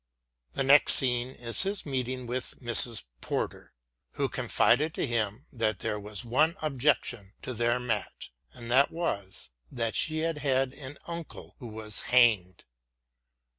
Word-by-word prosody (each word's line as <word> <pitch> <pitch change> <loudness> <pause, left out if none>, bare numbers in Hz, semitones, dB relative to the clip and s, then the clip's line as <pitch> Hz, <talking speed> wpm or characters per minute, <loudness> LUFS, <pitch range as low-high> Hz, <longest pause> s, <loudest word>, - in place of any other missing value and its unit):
The - - -1
next 140 +2 +6
scene 125 -2 0
is 120 -2 -3
his 195 +1 -2
meeting 130 -2 -3
with 125 +1 -4
Mrs. 120 -1 +5 0.2
Porter, - - -4 0.4
who - - -1
confided 155 +2 +2
to - - -1
him 115 -1 -2
that 110 -4 0
there 105 +2 -3
was 105 +2 -5
one 155 +8 +2
objection 125 -7 0
to 130 - -4
their 120 +1 +1
match 115 -4 -4 0.2
and 120 -1 -8
that 135 +3 +5
was 100 - -4 0.2
that 115 -2 -2
she 155 -1 +1
had 165 -2 -1
had 135 -2 +1
an 140 0 -8
uncle 170 -1 -8
who 125 - -8
was 110 -1 -4
hanged. 110 -8 +3
125 Hz, 145 wpm, -28 LUFS, 115-140 Hz, 0.4 s, next